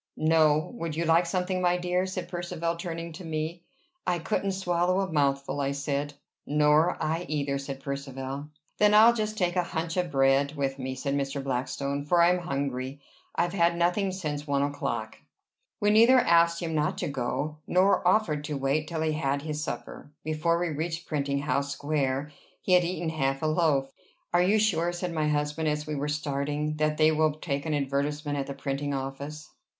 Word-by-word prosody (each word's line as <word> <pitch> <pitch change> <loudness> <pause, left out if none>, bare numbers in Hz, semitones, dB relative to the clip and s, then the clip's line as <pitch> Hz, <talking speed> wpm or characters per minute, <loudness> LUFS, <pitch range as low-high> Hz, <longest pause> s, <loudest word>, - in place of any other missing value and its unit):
"No. 155 -1 +3
Would 165 -5 -4
you 170 +1 -1
like 165 +2 +4
something, 185 +1 -1
my 180 0 +3
dear?" 180 +1 0
said 185 -1 -4
Percivale 175 -1 -3
turning 170 -1 -5
to 170 - -9
me. 160 +1 -3 0.5
"I 180 -1 +2
couldn't 195 +3 -1
swallow 180 0 +1
a 190 -4 -3
mouthful," 140 -1 +1
I 140 0 0
said. 140 +1 -2 0.3
"Nor 150 +3 +3
I 165 +3 -1
either," 140 -2 -1
said 135 -1 -6
Percivale. 140 0 -5 0.3
"Then 210 0 +5
I'll 225 +2 +8
just 215 -1 -2
take 180 -2 0
a 180 - +3
hunch 165 0 -3
of 180 -1 0
bread 135 +1 +3
with 135 -1 -2
me," 130 0 -3
said 140 +2 -2
Mr. 140 0 -2
Blackstone, 140 +2 -2
"for 170 +4 +2
I 170 +1 +6
am 180 - +1
hungry. 140 -4 -3 0.4
I've 175 +1 0
had 170 -2 +3
nothing 180 +3 +1
since 150 -5 -4
one 140 -1 +1
o'clock." 145 0 -3 0.6
We 205 -1 +3
neither 230 +4 +7
asked 170 -6 +4
him 165 -1 -2
not 150 0 0
to - - -2
go, 145 +3 -2
nor 185 0 +3
offered 180 -7 +2
to 145 -1 -3
wait 140 +3 0
till 165 -2 -3
he 160 - +1
had 145 -3 0
had 140 - -2
his 150 -1 -3
supper. 145 - -6
Before 155 +2 +1
we 175 0 -1
reached 165 +2 -3
Printing 140 -1 -1
House 140 0 0
Square 140 -1 -1 0.3
he 185 - +2
had 180 -1 +6
eaten 170 -1 -2
half 135 -2 -1
a - - +1
loaf. 155 -4 +2 0.4
"Are 175 - +5
you 195 +4 +4
sure," 175 -6 +2
said 175 0 -3
my 155 -2 0
husband, 150 +1 0
as 150 0 -1
we 155 - -4
were 145 0 -2
starting, 150 +1 -2
"that 155 0 +1
they 155 0 +5
will 155 -1 +2
take 140 -1 -3
an 155 - 0
advertisement 145 +1 -1
at 135 - -3
the 140 - -5
printing 140 +1 -2
office?" 140 +3 -6
155 Hz, 195 wpm, -28 LUFS, 140-175 Hz, 0.6 s, I'll